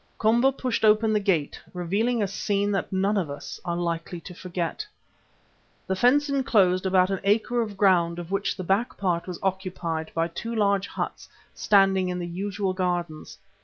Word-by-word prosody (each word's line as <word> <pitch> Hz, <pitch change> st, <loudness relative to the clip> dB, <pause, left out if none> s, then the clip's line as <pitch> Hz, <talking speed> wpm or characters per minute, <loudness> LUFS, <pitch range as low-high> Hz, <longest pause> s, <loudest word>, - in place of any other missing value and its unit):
Komba 235 Hz, +5 st, +3 dB
pushed 255 Hz, -3 st, -2 dB
open 215 Hz, 0 st, +4 dB
the 210 Hz, -, +3 dB
gate, 185 Hz, -8 st, 0 dB
revealing 210 Hz, +7 st, 0 dB
a -, -, 0 dB
scene 200 Hz, +1 st, -1 dB
that 195 Hz, -2 st, -2 dB
none 195 Hz, +2 st, +1 dB
of 175 Hz, -6 st, -1 dB
us 140 Hz, -, -7 dB
are 170 Hz, -1 st, -2 dB
likely 170 Hz, 0 st, -3 dB
to 180 Hz, -, -10 dB
forget. 180 Hz, -, -4 dB, 1.0 s
The 190 Hz, -, -1 dB
fence 260 Hz, +8 st, +3 dB
enclosed 200 Hz, -10 st, +2 dB
about 185 Hz, 0 st, +3 dB
an 195 Hz, -, -1 dB
acre 225 Hz, +4 st, +2 dB
of 210 Hz, -3 st, -5 dB
ground 175 Hz, -4 st, +3 dB
of 175 Hz, +1 st, -7 dB
which 195 Hz, 0 st, -1 dB
the 185 Hz, -, -4 dB
back 195 Hz, +7 st, 0 dB
part 180 Hz, -3 st, -1 dB
was 180 Hz, -2 st, -5 dB
occupied 180 Hz, -4 st, -3 dB
by 165 Hz, 0 st, +1 dB
two 230 Hz, +7 st, -5 dB
large 200 Hz, -2 st, +2 dB
huts -, -, -5 dB, 0.2 s
standing 195 Hz, -2 st, +3 dB
in 180 Hz, -, -2 dB
the 175 Hz, -, -3 dB
usual 190 Hz, +2 st, -3 dB
gardens. 175 Hz, -4 st, -3 dB
190 Hz, 175 wpm, -25 LUFS, 175-210 Hz, 1.0 s, open